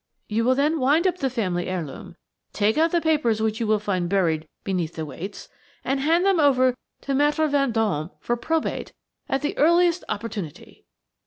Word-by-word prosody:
You 220 +2 0
will 255 +1 +4
then 300 +4 +1
wind 290 +7 +3
up 365 -1 +1
the 270 - 0
family 185 -8 -2
heirloom, 170 -3 -5 0.4
take 210 +1 +2
out 325 +2 +3
the 345 - +2
papers 295 -9 +1
which 220 +1 -1
you 230 - -1
will 215 0 +3
find 185 -4 -2
buried 165 -5 +1 0.2
beneath 180 -4 -2
the 160 - -4
weights, 190 +7 -8 0.4
and 270 0 0
hand 330 +6 +2
them 390 -3 +3
over 260 -4 +4 0.3
to 275 - -4
Maître 295 +3 +2
Vendôme 225 - 0
for 240 - -1
probate 320 +7 -2 0.4
at 270 +2 -1
the 295 - -1
earliest 340 +3 +4
opportunity. 205 -7 -6
240 Hz, 175 wpm, -24 LUFS, 195-300 Hz, 0.4 s, will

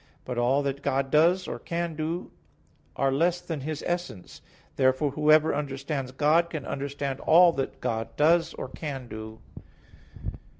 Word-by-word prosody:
But 125 -1 -3
all 130 +4 +2
that 140 0 -3
God 135 -1 -1
does, 175 +4 +4
or - - -5
can 170 -1 -3
do, 160 +3 -3 0.6
are 135 0 +1
less 170 +6 +2
than 165 -5 -5
His 155 +2 -4
essence. 175 - -4 0.3
Therefore 130 +2 +2
whoever 155 +2 +4
understands 140 -1 -3
God, 155 +5 +3
can 155 -5 -5
understand 140 -1 -4
all 170 +2 +6
that 135 -3 -4
God 115 0 -3
does, 165 +3 +3
or - - -5
can 135 -5 -6
do. 110 0 -8
145 Hz, 145 wpm, -27 LUFS, 135-165 Hz, 0.6 s, all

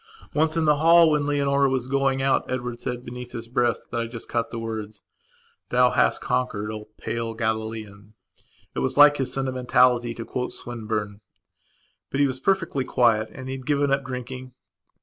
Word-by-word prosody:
Once, 155 +2 +1
in 165 - +2
the 150 -1 +4
hall, 165 +1 +6
when 150 -1 +1
Leonora 140 -1 +2
was 130 -2 -1
going 135 0 +1
out, 135 -1 +2
Edward 125 -2 -3
said, 125 0 -4
beneath 125 0 -8
his 115 0 -6
breathbut 120 -1 -1
I 115 - -3
just 115 -1 -7
caught 115 -1 -1
the 120 - -6
words: 110 -2 -6 0.7
"Thou 125 0 +4
hast - - +2
conquered, 125 -5 -1
O 105 -1 -7
pale 115 -1 -4
Galilean." 110 -2 -4 0.6
It - - -3
was 65 - -1
like 145 0 +8
his 135 - -1
sentimentality 125 -2 +2
to 115 - -6
quote 125 +1 -3
Swinburne. 110 -3 -4 0.9
But 140 - -2
he 145 - +5
was 130 -1 -2
perfectly 170 -4 0
quiet 110 -4 +2
and 130 -1 -9
he 130 - -3
had 130 - -12
given 145 -1 +2
up 140 0 +1
drinking. 130 0 -7
125 Hz, 175 wpm, -24 LUFS, 115-135 Hz, 0.9 s, like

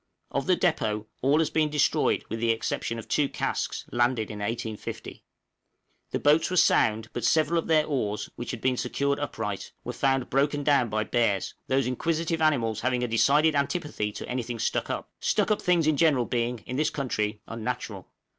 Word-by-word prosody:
Of - - -2
the - - +4
depôt 105 -1 0 0.2
all 140 +4 +3
has 160 -1 +1
been 155 -1 +2
destroyed 150 -1 +2
with 115 - -4
the 115 0 0
exception 115 0 -1
of 115 - -8
two 145 -2 +1
casks - - -2
landed 120 -2 +1
in 105 - -7
1850. 110 0 -5 0.9
The - - -1
boats 150 +3 +4
were 185 - -1
sound, 110 -7 +3
but 120 - -4
several 160 +6 +3
of - - -5
their 155 -2 +4
oars, 110 -8 -2
which 120 - -6
had 120 - -5
been 130 -1 +1
secured 140 +3 -1
upright, - - -4
were - - -5
found 135 -2 0
broken 145 +2 +1
down 140 -5 +3
by 110 0 0
bears 110 -4 0
those 135 0 +2
inquisitive 160 +5 -1
animals 115 -8 +2
having 125 0 0
a - - 0
decided 145 +7 +4
antipathy 140 - -1
to - - -7
anything 120 -1 -3
stuck 115 - -1
up - - -4
stuck - - +1
up 210 - +1
things 175 -3 +2
in 155 -2 +2
general 145 -7 +3
being, 120 -1 -2
in 125 - -4
this 155 - +2
country, 105 -6 -2
unnatural. 115 -4 -5
125 Hz, 185 wpm, -27 LUFS, 115-150 Hz, 0.9 s, the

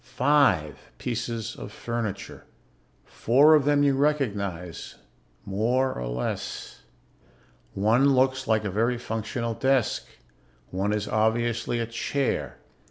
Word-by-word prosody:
Five 125 - +1
pieces 115 -2 -4
of - - -8
furniture. 110 -4 -5 0.6
Four 140 +7 +4
of 150 -3 +4
them 145 0 +3
you 140 -1 +3
recognize 100 - -2 0.5
more 120 +7 +1
or 60 - -5
less. - - -4 0.9
One 120 +8 +3
looks 130 +1 +1
like 110 -1 +2
a 100 - -2
very 115 +5 +1
functional 115 0 -3
desk. 130 -1 +1 0.6
One 95 +3 -1
is 105 -1 -1
obviously 115 +2 0
a 115 - -1
chair... 120 +4 -2
115 Hz, 110 wpm, -26 LUFS, 105-130 Hz, 0.9 s, Four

